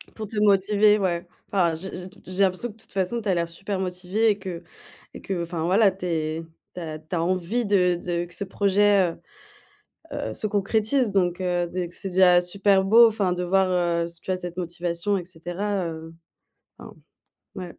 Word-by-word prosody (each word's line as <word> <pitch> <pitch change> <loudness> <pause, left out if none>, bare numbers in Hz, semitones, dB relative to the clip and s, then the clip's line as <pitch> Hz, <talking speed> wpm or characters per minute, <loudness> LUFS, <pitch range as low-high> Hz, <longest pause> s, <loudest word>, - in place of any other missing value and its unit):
pour 215 -1 -6
te 210 +1 -7
motiver, 210 +1 +4
ouais. 180 -2 -1 0.3
Enfin, 175 -5 +2
j'ai 185 +4 -7
j'ai 185 +1 -8
t 200 - -19
j'ai 185 +2 0
l'impression 185 +5 +1
que, - - -11
de 220 - -12
toute - - -13
façon, 195 +5 -1
tu 210 - -3
as - - +3
l'air 170 -1 0
super 190 +4 -5
motivé 185 +4 0
et 205 - -2
que 185 -3 -6 0.5
et - - -10
que 180 -3 -3
enfin 170 -1 -4
voilà, 195 +3 +4
tu 185 -1 -8
es 160 -2 -2 0.3
tu - - -5
as 155 -1 -6
tu 155 +3 -6
as 165 - 0
envie 185 +7 0
de 180 -3 +3
de 175 0 -3
que 175 - -12
ce 200 - -2
projet, 200 -2 +2 1.0
heu, - - -4
heu, - - -6
se 215 - -2
concrétise, 215 +3 +1
donc 180 -2 +1
heu, 175 -1 0
d 180 0 -3
c'est 190 +2 -4
déjà 180 -1 +5
super 195 +2 +2
beau, 230 +4 +7
enfin, 205 -5 0
de 180 0 -3
voir, 190 +1 +2
heu, 170 -1 +1
si 170 - -8
tu - - -11
as 185 - 0
cette 175 -1 -7
motivation 175 +2 -2
et 180 - -4
cetera, 180 +2 -3
heu, 160 0 -8 0.6
enfin, - - -11 0.6
ouais. 185 -2 -5
185 Hz, 210 wpm, -24 LUFS, 175-200 Hz, 1.0 s, beau